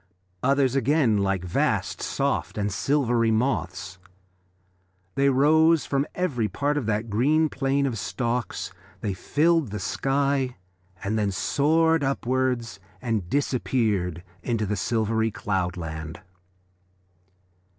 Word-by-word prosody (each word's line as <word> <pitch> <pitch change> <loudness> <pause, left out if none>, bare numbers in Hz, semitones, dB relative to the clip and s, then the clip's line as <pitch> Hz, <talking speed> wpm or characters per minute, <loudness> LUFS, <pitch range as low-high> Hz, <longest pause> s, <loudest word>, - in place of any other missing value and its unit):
Others 135 -1 +2
again 135 -4 +3
like 95 -2 0
vast 85 - 0
soft - - -1
and 105 -1 0
silvery 120 0 +1
moths. 95 -6 -1 1.1
They 140 0 +3
rose 155 +4 +4
from 140 +1 0
every 140 -12 0
part 145 +9 -1
of 140 -7 -2
that 110 +1 -1
green 150 +9 +3
plain 140 0 0
of 120 -6 -2
stalks, 120 -4 -3 0.3
they 105 -3 -1
filled 155 - +2
the 105 - -4
sky, 135 +4 0 0.5
and 110 +3 0
then 105 -1 +1
soared 160 - +2
upwards 130 -5 -1 0.2
and 110 -6 -2
disappeared 110 - 0 0.2
into 115 -3 -1
the 105 +1 -1
silvery 110 +2 0
cloudland. 90 -6 -3
120 Hz, 110 wpm, -25 LUFS, 105-140 Hz, 1.1 s, rose